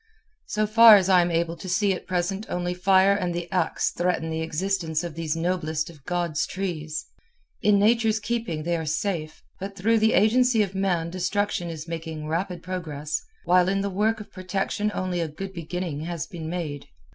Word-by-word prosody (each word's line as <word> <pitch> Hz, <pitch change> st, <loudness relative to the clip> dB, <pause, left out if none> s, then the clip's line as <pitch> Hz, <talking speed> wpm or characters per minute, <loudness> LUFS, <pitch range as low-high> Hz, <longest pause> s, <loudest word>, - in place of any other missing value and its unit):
So 215 Hz, 0 st, 0 dB
far 225 Hz, +1 st, +9 dB
as 195 Hz, -2 st, +3 dB
I 185 Hz, -2 st, +6 dB
am 175 Hz, -, +1 dB
able 170 Hz, 0 st, 0 dB
to 185 Hz, +2 st, -8 dB
see 195 Hz, +2 st, +2 dB
at 180 Hz, -, -7 dB
present 185 Hz, +3 st, -1 dB
only 180 Hz, 0 st, -1 dB
fire 190 Hz, +2 st, +4 dB
and 180 Hz, -4 st, -1 dB
the 175 Hz, 0 st, -3 dB
ax 185 Hz, -, 0 dB
threaten 175 Hz, -2 st, -1 dB
the 160 Hz, 0 st, -2 dB
existence 165 Hz, 0 st, -1 dB
of 170 Hz, -2 st, -5 dB
these 160 Hz, -1 st, -2 dB
noblest 165 Hz, -2 st, -1 dB
of 150 Hz, -4 st, -18 dB
God's 175 Hz, -4 st, -1 dB
trees. 160 Hz, -5 st, -4 dB, 0.6 s
In 205 Hz, -1 st, +4 dB
Nature's 220 Hz, +1 st, +3 dB
keeping 210 Hz, -8 st, -2 dB
they 170 Hz, +1 st, 0 dB
are 160 Hz, -, -3 dB
safe, 160 Hz, 0 st, -2 dB, 0.2 s
but 195 Hz, +1 st, -6 dB
through 220 Hz, +4 st, +2 dB
the 220 Hz, +1 st, +3 dB
agency 230 Hz, +1 st, +4 dB
of 195 Hz, -2 st, -5 dB
man 180 Hz, -4 st, 0 dB
destruction 185 Hz, 0 st, -1 dB
is 160 Hz, 0 st, -7 dB
making 160 Hz, -2 st, -5 dB
rapid 175 Hz, +2 st, -2 dB
progress, 155 Hz, -5 st, -3 dB, 0.2 s
while 180 Hz, +1 st, +4 dB
in 195 Hz, 0 st, +1 dB
the 200 Hz, 0 st, -2 dB
work 215 Hz, +4 st, +1 dB
of 210 Hz, -, -10 dB
protection 195 Hz, +2 st, -2 dB
only 185 Hz, -1 st, -1 dB
a 165 Hz, -, -1 dB
good 190 Hz, +6 st, -7 dB
beginning 170 Hz, -2 st, -4 dB
has 165 Hz, -1 st, -4 dB
been 160 Hz, -3 st, -7 dB
made. 160 Hz, -5 st, -4 dB
180 Hz, 190 wpm, -25 LUFS, 165-195 Hz, 0.6 s, far